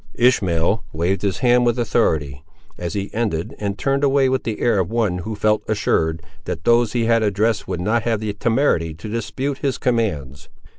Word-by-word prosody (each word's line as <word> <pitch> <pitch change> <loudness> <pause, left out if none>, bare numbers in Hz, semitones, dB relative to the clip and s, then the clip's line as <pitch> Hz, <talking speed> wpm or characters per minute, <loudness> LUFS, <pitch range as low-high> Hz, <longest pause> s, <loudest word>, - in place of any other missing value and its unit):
Ishmael 100 -5 +2
waved 85 +5 0
his 100 -2 -1
hand 125 0 +5
with 120 0 +1
authority, 75 - 0 0.3
as 85 -2 -5
he 100 0 -4
ended, 105 -8 -2
and 100 -1 -3
turned 135 +6 0
away 135 -1 +3
with 130 0 -1
the 110 -2 -3
air 115 -4 +2
of 90 - 0
one 110 -6 0
who 110 +5 -5
felt 105 +1 +2
assured, 80 -6 0 0.2
that 80 - -4
those 120 0 +3
he 120 -2 +1
had 115 0 +3
addressed 110 +1 0
would 90 -2 -3
not 110 +5 +1
have 115 -1 0
the 105 -1 -3
temerity 105 - +1
to 85 +7 -9
dispute 115 +6 -3
his 135 -3 -1
commands. 75 - -2
105 Hz, 190 wpm, -21 LUFS, 90-120 Hz, 0.3 s, hand